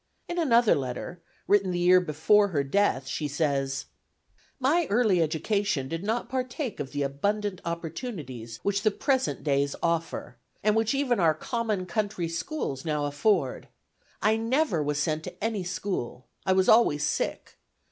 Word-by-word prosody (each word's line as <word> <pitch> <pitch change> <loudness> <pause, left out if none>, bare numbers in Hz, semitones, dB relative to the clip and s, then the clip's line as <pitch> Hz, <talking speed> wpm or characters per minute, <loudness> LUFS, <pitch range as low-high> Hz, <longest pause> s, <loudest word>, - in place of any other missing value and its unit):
In 350 0 -3
another 240 -8 +4
letter, 135 +6 -4 0.3
written 200 -2 +3
the 180 - -1
year 180 +1 +5
before 180 +6 +3
her 150 -7 0
death, 135 -3 +1
she 150 +3 -3
says: 140 -2 -1 0.7
"My 300 +5 +2
early 205 -5 +3
education 160 -1 0
did 165 +4 -4
not 225 +3 -1
partake 255 0 -3
of 135 - -4
the 145 -1 -1
abundant 200 +8 -1
opportunities 165 - -5
which 200 0 0
the 215 - +4
present 260 +5 0
days 140 -1 +1
offer, 165 -7 -2 0.3
and 210 +1 +3
which 225 +3 +2
even 265 -5 +1
our 160 -3 +4
common 215 +1 -2
country 190 -1 -2
schools 165 - -3
now 150 -2 -1
afford. 145 0 0 0.6
I 215 +1 +4
never 230 - +1
was 145 0 -1
sent 155 +1 -1
to - - -9
any 220 -4 -1
school. 175 - -4 0.2
I 190 - +5
was 190 0 +3
always 185 -10 +5
sick. - - -2
180 Hz, 155 wpm, -27 LUFS, 150-220 Hz, 0.7 s, year